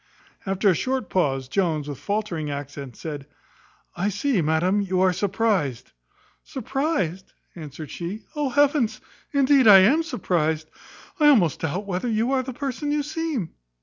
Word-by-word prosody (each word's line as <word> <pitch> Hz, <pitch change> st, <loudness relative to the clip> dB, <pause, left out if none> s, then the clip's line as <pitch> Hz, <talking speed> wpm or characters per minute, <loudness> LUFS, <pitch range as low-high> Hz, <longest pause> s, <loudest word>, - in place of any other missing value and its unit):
After 195 Hz, +2 st, +1 dB
a -, -, +5 dB
short 255 Hz, +4 st, -2 dB
pause, 135 Hz, -8 st, 0 dB
Jones, 155 Hz, -2 st, 0 dB
with 145 Hz, -3 st, -6 dB
faultering 200 Hz, -7 st, -2 dB
accents, 140 Hz, -3 st, -7 dB
said 145 Hz, -3 st, -6 dB, 0.7 s
"I 195 Hz, +4 st, 0 dB
see, 245 Hz, 0 st, 0 dB
madam, 170 Hz, +6 st, +1 dB
you 190 Hz, -2 st, -1 dB
are 185 Hz, -1 st, +4 dB
surprized." 195 Hz, -, -1 dB, 0.5 s
"Surprized!" 260 Hz, -, -3 dB, 0.2 s
answered 155 Hz, -2 st, -8 dB
she; 180 Hz, +6 st, -6 dB
"Oh 295 Hz, -2 st, 0 dB
heavens! 280 Hz, -5 st, +2 dB, 0.3 s
Indeed, 275 Hz, -3 st, +4 dB
I 200 Hz, -2 st, +10 dB
am 275 Hz, +12 st, +4 dB
surprized. 160 Hz, -, -1 dB, 0.5 s
I 300 Hz, -, +5 dB
almost 210 Hz, -, +4 dB
doubt 170 Hz, +6 st, -3 dB
whether 190 Hz, +4 st, -3 dB
you 225 Hz, +3 st, 0 dB
are 265 Hz, -1 st, +2 dB
the 260 Hz, +1 st, -6 dB
person 280 Hz, +3 st, -3 dB
you 295 Hz, 0 st, 0 dB
seem." 295 Hz, -, -3 dB
195 Hz, 150 wpm, -24 LUFS, 160-260 Hz, 0.7 s, I